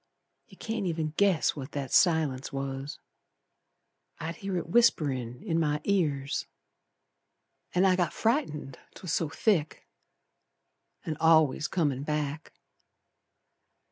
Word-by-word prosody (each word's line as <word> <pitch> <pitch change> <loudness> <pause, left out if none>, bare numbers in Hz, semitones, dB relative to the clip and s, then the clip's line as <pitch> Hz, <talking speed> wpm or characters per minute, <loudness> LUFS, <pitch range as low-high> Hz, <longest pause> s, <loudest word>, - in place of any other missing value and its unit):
You - - -17
can't 220 -3 -3
even 160 -2 -2
guess 195 -5 +2
what 140 -1 -8
that 140 -2 -4
silence 155 -7 +2
was. 135 +1 -4 1.2
I'd 165 +1 -5
hear 195 -2 -3
it - - -3
whisperin' 140 - +2
in 165 -6 0
my 150 -2 +1
ears, 145 -8 0 1.3
An' 180 +2 +4
I 185 -1 +5
got 180 -2 0
frightened, 185 - -1 0.2
'twas 180 -4 -5
so 160 - 0
thick, 160 -2 0 1.2
An' 155 -2 -3
al'ays 160 -2 +4
comin' 145 -7 0
back. 150 +1 -3
160 Hz, 110 wpm, -28 LUFS, 140-180 Hz, 1.3 s, I